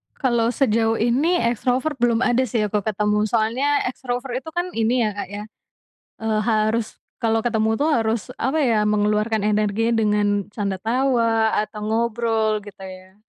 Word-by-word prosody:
Kalau 235 -4 +1
sejauh 225 -3 +2
ini 265 +11 +2
extrovert 250 +5 0
belum 235 0 +2
ada 255 +1 +2
sih 220 -1 0
aku 210 0 0
ketemu, 210 +1 0
soalnya 240 +7 +1
extrovert 250 0 -3
itu 320 - -10
kan 355 +1 -2
ini 230 +2 +1
ya, - - +1
Kak, 205 - -5
ya, 205 +1 -6 0.8
eee, 220 -1 0
harus 220 0 0 0.2
kalau 225 0 +2
ketemu 220 -1 0
tuh 295 - +2
harus 225 -5 +1
apa 270 +6 -1
ya, 230 -7 +2
mengeluarkan 210 0 +1
energinya 215 +2 +1
dengan 210 -1 +2 0.2
canda 200 -2 -2
tawa 230 0 +1
atau 215 0 -9
ngobrol 225 -1 0
gitu 200 -1 -12
ya. 185 0 -11
225 Hz, 155 wpm, -22 LUFS, 210-245 Hz, 0.8 s, sejauh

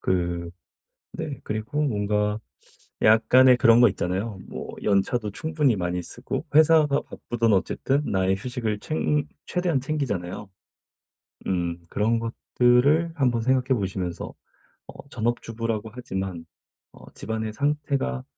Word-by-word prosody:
그 85 -2 -1 0.6
네 - - -5
그리고 110 +8 -2
뭔가 105 -4 0 0.6
약간의 120 +4 +6
그런 115 0 +6
거 120 - +7
있잖아요. 95 +3 -3
뭐 - - -7
연차도 105 +2 +1
충분히 150 -2 +1
많이 90 -1 -2
쓰고 120 - -5
회사가 155 -2 +5
바쁘든 115 -1 -2
어쨌든 135 +8 +1
나의 95 0 +1
휴식을 115 -2 -3
챙 150 0 -1 0.2
최대한 175 -7 0
챙기잖아요. 105 - -3 1.0
음 85 -2 -1
그런 115 +2 +1
것들을 125 +7 +2
한번 125 -5 +1
생각해 130 +1 +2
보시면서 95 -3 -3 0.6
어 140 - -12
전업주부라고 115 -2 -2
하지만 95 -8 -5 0.5
어 - - -15
집안의 110 0 -4
상태가 140 - -1
115 Hz, 270 characters per minute, -25 LUFS, 95-130 Hz, 1.0 s, 거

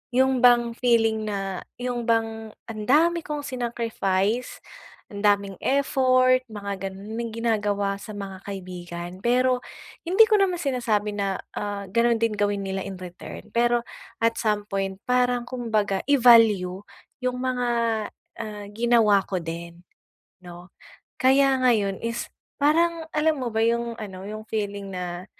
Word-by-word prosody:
yung 260 0 +3
bang 240 -1 +5
feeling 225 -3 +2
na 195 -3 -3 0.2
yung 245 -1 -3
bang 225 -1 -1 0.2
ang 215 -1 -5
dami 335 +4 +3
kong 300 -1 -3
sinacrifice, 235 -4 -1 0.5
ang 200 0 -4
daming 200 -2 +2
effort 255 -2 +3
mga 200 -3 -5
ganun 200 +4 -8
na 235 - -2
ginagawa 205 -3 0
sa 210 +1 -9
mga 195 -2 -7
kaibigan. 175 -3 -7
Pero 250 +1 +3 0.5
hindi 370 +6 +4
ko 430 - +5
naman 370 -2 +2
sinasabi 220 -7 -1
na 195 -1 -1 0.2
ah, 200 -1 -4
ganun 235 +2 +2
din 230 -1 +2
gawin 205 -1 0
nila 190 0 -3
in-return, 185 -2 -9
pero 240 0 +2 0.4
at 230 0 +2
some 210 -2 0
point 195 0 -3
parang 250 -1 +1
kumbaga 220 -6 -1
i-value 230 -9 +5 0.5
yung 250 0 0
mga, 255 -1 -1 0.7
ah, 210 -2 -6
ginawa 220 -3 +3
ko 185 -2 -2
din, 170 +1 -7 0.6
no? 175 0 -12 0.5
Kaya 270 +1 +5
ngayon 210 -6 +2
is 230 +1 -3 0.4
parang 330 +2 +3
alam 310 0 +1
mo 240 - -2
ba 220 - 0
yung 235 +1 +1
ano, 190 -3 -7
yung 215 +1 -7
feeling 200 -2 -3
na 180 0 -5
220 Hz, 135 wpm, -25 LUFS, 195-245 Hz, 0.7 s, bang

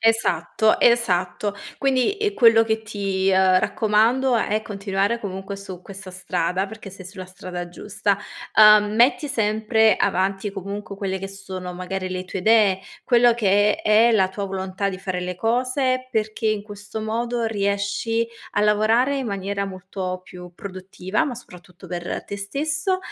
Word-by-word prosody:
Esatto, 220 -2 +2
esatto. 200 -4 +2 0.2
Quindi 270 +7 +1
e 420 -1 0
quello 225 -2 +6
che 220 0 -1
ti, 195 -3 -1
uhm, 185 -1 +5
raccomando 230 +6 +2
è 215 -1 0
continuare 200 +2 -1
comunque 195 -1 -6
su 190 -2 -9
questa 195 -1 -10
strada, 180 +1 -1
perché 215 0 -10
sei 185 -1 -11
sulla 185 0 -8
strada 180 -1 -7
giusta. 200 +2 -1 0.4
Uhm, 215 -1 +7
metti 245 +5 +3
sempre 220 -2 +2
avanti, 195 +2 0
comunque, 200 +1 -6
quelle 190 -1 -3
che 195 - -5
sono, 190 -2 -7
magari, 185 +1 -4
le 185 0 -4
tue 185 - -5
idee, 210 -2 +4 0.2
quello 240 -1 +5
che 205 -1 +3
è - - -19
è 220 +3 +6
la 190 -4 +3
tua 200 +1 -5
volontà 190 +1 -3
di 185 -1 -5
fare 185 -1 -3
le 180 0 -4
cose, 255 +4 0
perché 220 0 -1
in 215 -1 +1
questo 205 +1 -8
modo 235 +2 -2
riesci 205 +2 -1 0.3
a - - +1
lavorare 220 +6 +3
in 265 -3 -3
maniera 200 0 -2
molto 185 -1 -5
più 180 -1 -12
produttiva, 190 - -3
ma 265 -5 -3
soprattutto 180 -5 -13
per 175 0 -4
te 200 - -6
stesso 295 - -1
200 Hz, 155 wpm, -22 LUFS, 190-225 Hz, 0.4 s, Uhm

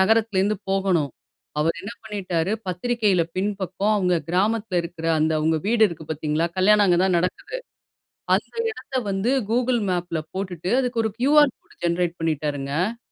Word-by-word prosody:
நகரத்திலேருந்து 210 -1 +2
போகணும். 190 -7 +1 0.5
அவரு 165 +2 +2
என்ன 205 +4 -6
பண்ணிட்டாரு 190 -4 -2
பத்திரிக்கையில 200 0 +1
பின்பக்கம் 200 +1 0
அவங்க 180 -3 +2
கிராமத்தில 205 +1 +1
இருக்கற 170 -1 -6
அந்த 155 +1 +2
அவங்க 160 +1 +2
வீடு 225 +1 +3
இருக்கு 160 -2 -8
பார்த்தீங்களா? 155 +2 0
கல்யாணம் 205 +2 +5
அங்க 175 -1 +4
தான் 185 -2 +3
நடக்குது. 180 - -3 0.8
அந்த - - -4 0.2
இடத்த 275 - -9
வந்து 195 +6 0 0.2
கூகுள் 245 +1 +2
மேப்பில 175 -2 -1 0.2
போட்டுட்டு 185 -2 -3
அதுக்கு 245 -2 0
ஒரு 220 - 0
கியூஆர் 290 +1 +5
கோட் - - -24
ஜெனரேட் 170 0 0
பண்ணிட்டாருங்க. 155 +5 -1
190 Hz, 140 wpm, -23 LUFS, 170-215 Hz, 0.8 s, கல்யாணம்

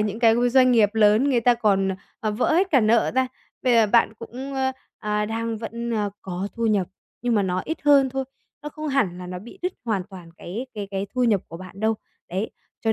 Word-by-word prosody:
những 210 +1 -1
cái, 225 -2 +5
ờ, 245 +1 +2
doanh 255 0 +5
nghiệp 215 -3 +5
lớn 220 +5 +4
người 245 -3 +3
ta 245 +1 +4
còn, 200 -4 +2
ờ, 190 - -1 0.3
ờ, 215 - 0
vỡ 210 +8 +1
hết 370 +3 +2
cả 270 - +5
nợ 225 +1 +3
ra. 260 0 +3 0.4
Bây 250 - +3
giờ 225 -2 +5
bạn 220 +1 +3
cũng, 260 +4 -7
a, 265 0 0 0.3
à, 210 0 -1
đang 225 +1 -2
vẫn, 235 +1 -5
ờ, 210 -3 0
có 190 +2 -4
thu 230 -1 -1
nhập 205 -5 +2 0.4
nhưng 240 -1 +1
mà 205 - +3
nó 185 -1 -1
ít 320 - -3
hơn 280 -2 +5
thôi, 265 0 -2 0.4
nó 295 - -4
không 305 +1 -6
hẳn 215 -11 +1
là 180 - -7
nó 180 0 -5
bị 235 - -12
đứt 365 +1 -1
hoàn 215 -5 0
toàn 180 -3 -11
cái 220 +9 -6
cái 205 -2 -5
cái 195 0 -2
thu 250 -1 +2
nhập 210 -5 +3
của 165 - -8
bạn 185 +2 -11
đâu, 220 +1 +2 0.4
đấy, 190 +5 -2 0.3
cho 225 - +1
225 Hz, 245 wpm, -24 LUFS, 200-250 Hz, 0.4 s, cái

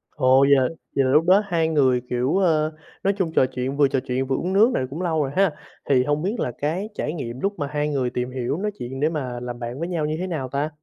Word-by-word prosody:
Ồ, 130 -2 +4
vậy 140 - +4
là 130 - +3 0.3
vậy 135 - +3
là 130 - +2
lúc 155 +4 +4
đó 190 +3 +6
hai 170 -4 +1
người, 135 -6 +3
kiểu, 125 +8 +1
ờ, 155 -4 +2 0.3
nói 195 - +2
chung 180 -5 0
trò - - +5
chuyện 130 +2 -4
vừa 145 -2 +5
trò 135 -1 0
chuyện 130 +1 -1
vừa 135 - 0
uống 180 +7 -2
nước 220 +6 +5
này - - 0
cũng 150 +6 -5
lâu 160 -4 0
rồi 135 - -3
ha. 195 -2 +3 0.4
Thì 130 -2 +4
hông 145 +2 0
biết 210 +6 -2
là 125 - -1
cái 170 +8 -1
trải 150 - -2
nghiệm 125 -6 -5
lúc 200 +5 0
mà 145 - -1
hai 150 +1 -1
người 130 -4 0
tìm 125 +1 -3
hiểu 130 +2 -2
nói 210 +3 -2
chuyện 130 +2 -5
để 155 +2 +2
mà 130 -6 -4
làm 120 0 -6
bạn 120 +2 -5
với 170 - -2
nhau 165 -4 -1
như 155 +1 -1
thế 185 - -2
nào 140 -7 -3
ta? 140 +3 -1
145 Hz, 285 wpm, -23 LUFS, 130-170 Hz, 0.4 s, đó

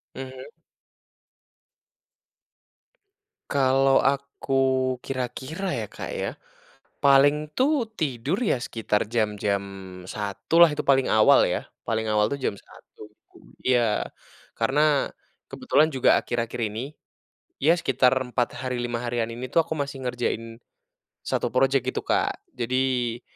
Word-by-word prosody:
Mhm. 130 - -8 3.0
Kalau 135 0 +4
aku 140 0 -1 0.5
kira-kira, 135 +8 -4
ya, 115 -5 -3
Kak, - - -7
ya. - - -2 0.7
Paling 145 +2 +4
tuh, 275 -2 +2
tidur, 145 - -1
ya 200 - +1
sekitar 110 -3 -1
jam-jam 105 -3 0 0.4
1.00 100 - -2
lah, 170 -3 +7
itu 150 - -3
paling 135 -2 +3
awal 110 0 +5
ya, - - -1 0.2
paling 110 -1 -1
awal 105 0 +3
tuh 140 - -3
jam - - 0
1.00, 105 - -15 0.2
tuh - - -19 0.2
iya. 120 -4 +2 0.6
Karena, 150 -1 +2 0.4
kebetulan 150 +3 +1
juga, 130 - +4
akhir-akhir 115 -1 -3
ini, 115 +4 -3 0.7
ya, 165 +5 +4
sekitar 130 -6 +3 0.2
4 120 -1 0
hari, 125 -1 -3
5 120 -1 -2
harian, 120 -1 -1
ini 120 +2 -6
tuh, 165 - +5
aku 160 -1 -5
masih 140 -2 -4
ngerjain 120 -2 -3 0.7
satu - - -1
projek, - - +2
gitu - - -2
Kak. 400 0 0 0.2
Jadi, 125 - -1
130 Hz, 120 wpm, -25 LUFS, 115-140 Hz, 3.0 s, lah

